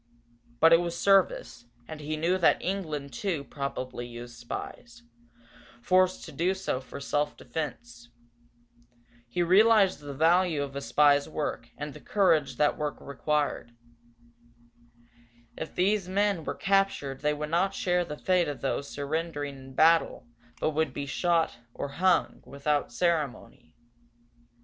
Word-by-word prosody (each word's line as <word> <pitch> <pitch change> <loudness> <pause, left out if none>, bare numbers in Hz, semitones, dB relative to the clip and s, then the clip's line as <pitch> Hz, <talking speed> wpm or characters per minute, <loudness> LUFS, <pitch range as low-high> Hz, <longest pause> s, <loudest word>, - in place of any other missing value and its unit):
But 165 +1 +7
it 165 - +7
was 170 -1 -4
service, 185 -11 +2 0.2
and 155 -1 -8
he 155 +1 -4
knew 175 +4 +1
that 170 - +4
England, 155 -8 -4
too, 165 +2 -2
probably 130 -3 -5
used 120 0 -9
spies, 120 0 -8 0.8
forced 185 +3 +2
to - - -9
do 180 +3 0
so 190 -9 -2
for 135 - -9
self 145 +1 -1
defence. 120 -4 -6 1.2
He 175 +9 0
realized 200 +2 +5
the 145 -1 -8
value 165 0 +3
of 140 -1 -7
the 140 - -4
spy's 145 0 +3
work, 145 -6 -4
and 150 -1 -6
the 150 - -11
courage 155 -9 +2
that 150 +4 +1
work 150 -2 -2
required. 145 -3 -2 1.8
If 160 - -7
these 195 0 +1
men 200 -4 +1
were - - -3
captured 195 -9 0
they 150 0 +1
would 150 +1 -5
not 180 +4 +1
share 180 -1 +1
the 150 -3 -7
fate 180 -1 +2
of 145 -5 -5
those 140 +1 -2
surrendering 145 0 -3
in 130 0 -12
battle 165 +3 +3 0.3
but 155 - +1
would 155 -3 -1
be 140 - -4
shot, 165 -3 0 0.2
or 140 - -4
hung, 180 +4 +1
without 145 0 -1
ceremony. 145 - -2
150 Hz, 140 wpm, -28 LUFS, 140-175 Hz, 1.8 s, But